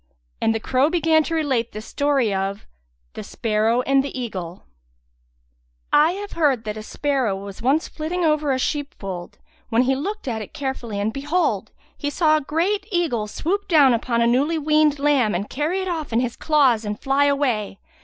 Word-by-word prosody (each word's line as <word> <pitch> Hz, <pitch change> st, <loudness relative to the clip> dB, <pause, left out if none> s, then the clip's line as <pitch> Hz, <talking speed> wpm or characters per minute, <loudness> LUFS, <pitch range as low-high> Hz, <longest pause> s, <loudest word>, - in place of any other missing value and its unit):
And 225 Hz, -, +2 dB
the -, -, -1 dB
crow 260 Hz, +6 st, +2 dB
began 325 Hz, -2 st, +3 dB
to 330 Hz, -, -2 dB
relate 265 Hz, -7 st, 0 dB
the 210 Hz, -, -5 dB
story 270 Hz, -1 st, 0 dB
of 195 Hz, +1 st, -3 dB, 0.5 s
The -, -, -6 dB
Sparrow 225 Hz, +2 st, 0 dB
and 270 Hz, +1 st, +2 dB
the 275 Hz, -1 st, -5 dB
Eagle 185 Hz, -7 st, -6 dB, 1.3 s
I 310 Hz, +4 st, +5 dB
have 405 Hz, +1 st, -6 dB
heard 280 Hz, -8 st, +1 dB
that 210 Hz, -1 st, -4 dB
a 215 Hz, -, -6 dB
sparrow 260 Hz, -2 st, -1 dB
was 195 Hz, +2 st, -8 dB
once 275 Hz, +7 st, +2 dB
flitting 335 Hz, +3 st, -3 dB
over 305 Hz, -2 st, +2 dB
a 260 Hz, -, +1 dB
sheep 290 Hz, +2 st, -2 dB
fold, 185 Hz, -3 st, -7 dB, 0.3 s
when 230 Hz, +2 st, +3 dB
he 265 Hz, +1 st, +1 dB
looked 395 Hz, +7 st, -4 dB
at 225 Hz, -3 st, -2 dB
it 210 Hz, -, -10 dB
carefully 255 Hz, -6 st, -4 dB
and 210 Hz, +2 st, -1 dB
behold, 295 Hz, +7 st, -1 dB, 0.2 s
he 290 Hz, -, -3 dB
saw 310 Hz, +1 st, +3 dB
a -, -, -2 dB
great 360 Hz, +8 st, -1 dB
eagle 310 Hz, -, 0 dB
swoop 385 Hz, -, -2 dB
down 290 Hz, -7 st, +5 dB
upon 235 Hz, 0 st, 0 dB
a -, -, +3 dB
newly 275 Hz, +7 st, +2 dB
weaned 305 Hz, -1 st, +3 dB
lamb 275 Hz, -8 st, +2 dB
and 200 Hz, +4 st, -3 dB
carry 315 Hz, +8 st, -1 dB
it 375 Hz, -, -4 dB
off 320 Hz, -6 st, -3 dB
in 230 Hz, -, +2 dB
his 245 Hz, -1 st, -2 dB
claws 270 Hz, -8 st, +3 dB
and 210 Hz, 0 st, -4 dB
fly 275 Hz, +1 st, +2 dB
away. 255 Hz, -9 st, 0 dB
275 Hz, 190 wpm, -22 LUFS, 225-310 Hz, 1.3 s, I